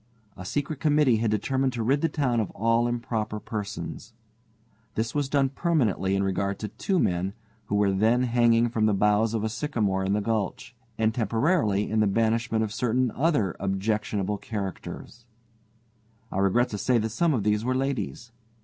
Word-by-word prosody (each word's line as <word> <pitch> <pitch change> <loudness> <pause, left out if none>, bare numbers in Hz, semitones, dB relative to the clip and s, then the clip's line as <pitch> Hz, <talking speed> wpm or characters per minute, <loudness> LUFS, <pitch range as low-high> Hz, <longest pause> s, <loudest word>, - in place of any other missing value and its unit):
A 95 - -9
secret 145 - -3
committee 150 -6 +3
had 110 0 0
determined 130 +5 0
to 115 -2 -2
rid 135 +5 +2
the 165 - +2
town 130 -6 0
of 110 - -1
all 115 +3 +2
improper 115 -3 -2
persons. 105 +2 -6 0.8
This 115 +1 -1
was 145 -2 -1
done 135 -2 +2
permanently 125 - 0
in 100 - +1
regard 100 +1 -2
of 105 - -5
two 195 - +1
men 90 - 0 0.3
who 105 - -2
were 100 -1 +3
then 110 +6 +2
hanging 120 -1 +3
from 110 -2 +1
the 105 - +2
boughs 105 +3 +2
of 110 - -1
a - - +1
sycamore 110 -6 -1
in 95 +1 0
the 105 - +2
gulch, 110 +2 -2 0.2
and 110 0 +1
temporarily 115 - +1
in 110 - 0
the 105 - +3
banishment 115 +2 +1
of 110 -1 -3
certain 125 +1 +1
other 130 - +1
objectionable 100 +1 -1
characters. 105 +3 -6 1.0
I 95 - -2
regret 100 +6 +2
to 105 - -5
say 125 +3 +2
that 110 0 0
some 160 +6 +1
of 110 - -1
these 105 +1 +1
were 130 +2 0
ladies. 120 - -3
110 Hz, 175 wpm, -26 LUFS, 105-125 Hz, 1.0 s, committee